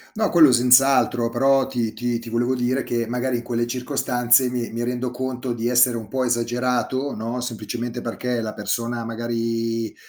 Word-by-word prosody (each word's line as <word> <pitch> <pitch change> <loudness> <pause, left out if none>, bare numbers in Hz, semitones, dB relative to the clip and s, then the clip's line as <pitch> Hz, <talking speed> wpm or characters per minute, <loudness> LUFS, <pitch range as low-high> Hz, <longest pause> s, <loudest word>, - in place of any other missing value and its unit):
No, 215 0 0
quello 160 -5 +7
senz'altro, 125 -1 +4
però 135 +3 +2
ti 120 -4 -2
ti 120 -1 -2
ti 115 0 -10
volevo 120 +2 0
dire 130 +2 0
che 120 -1 -2
magari 125 +2 -1
in 120 - -4
quelle 120 -1 -2
circostanze 125 0 +2
mi 120 -1 -3
mi 115 +1 -3
rendo 125 +1 -2
conto 125 0 -4
di 120 0 -2
essere 125 0 +4
un 110 -2 -9
po' 130 +2 -1
esagerato, 125 +3 -1
no, 115 +3 -4
semplicemente 120 +1 -5
perché 120 +1 -3
la 110 -1 -4
persona 115 +2 -3
magari 115 -1 -2
120 Hz, 175 wpm, -22 LUFS, 115-125 Hz, -, quello